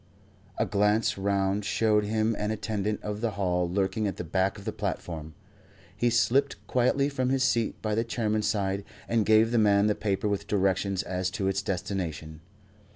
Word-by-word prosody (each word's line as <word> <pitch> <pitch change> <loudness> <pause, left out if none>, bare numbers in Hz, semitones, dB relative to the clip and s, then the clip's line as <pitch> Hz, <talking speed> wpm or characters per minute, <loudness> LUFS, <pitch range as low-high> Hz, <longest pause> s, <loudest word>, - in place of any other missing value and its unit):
A - - +1
glance 105 +2 +2
round 100 +1 0
showed 105 0 +2
him 110 +1 +1
an 105 - -1
attendant 105 -1 -2
of 105 0 -4
the 115 -3 -1
hall 90 -3 0
lurking 100 +3 0
at 100 - -4
the - - -4
back 95 +4 0
of 100 - -11
the - - -1
platform. 80 -2 -5 0.6
He 120 - +2
slipped 120 +4 +2
quietly 130 +3 +2
from 130 -3 -1
his 135 0 +2
seat 115 -4 +1
by 110 -1 0
the 115 +2 +1
Chairman's 110 -2 -1
side 100 -1 -1 0.2
and 115 -3 +1
gave 110 +1 +5
the 120 - +3
man 100 -1 +4
the 105 - +3
paper 100 0 -1
with 100 -1 -2
directions 95 -1 +1
as 90 0 -2
to 95 0 -2
its 95 0 0
destination. 85 -5 -4
105 Hz, 180 wpm, -28 LUFS, 95-110 Hz, 0.6 s, gave